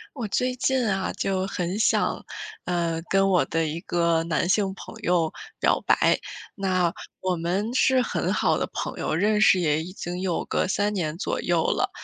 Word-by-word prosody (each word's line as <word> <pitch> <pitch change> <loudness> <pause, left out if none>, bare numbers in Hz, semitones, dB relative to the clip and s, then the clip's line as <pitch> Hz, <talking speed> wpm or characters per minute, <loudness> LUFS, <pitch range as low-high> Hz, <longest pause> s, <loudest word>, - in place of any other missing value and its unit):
我 235 -5 -3
最 250 +5 0
近 255 -1 +1
啊， 195 -2 0
就 190 -1 -1
很 180 +2 -3
想， 225 - +1 0.4
呃， 170 -2 -1
跟 195 0 +3
我 180 -3 +4
的 165 0 0
一 160 +2 -4
个 170 -1 +1
男 165 0 0
性 195 +1 +2
朋 - - -10
友 170 -3 +1 0.3
表 - - +2
白。 - - +4 0.3
那 185 -3 +1 0.3
我 185 -1 0
们 185 +7 -1
是 260 0 +4
很 250 - -1
好 - - +2
的 - - -2
朋 - - -4
友， - - -1
认 210 +5 +2
识 190 -3 +6
也 155 -3 +1
已 180 - -8
经 180 -1 -5
有 185 -3 -1
个 - - 0
3 205 +2 0
年 165 -5 -2
左 - - -2
右 170 -2 +1
了。 - - +1
185 Hz, 195 characters per minute, -25 LUFS, 170-205 Hz, 0.4 s, 识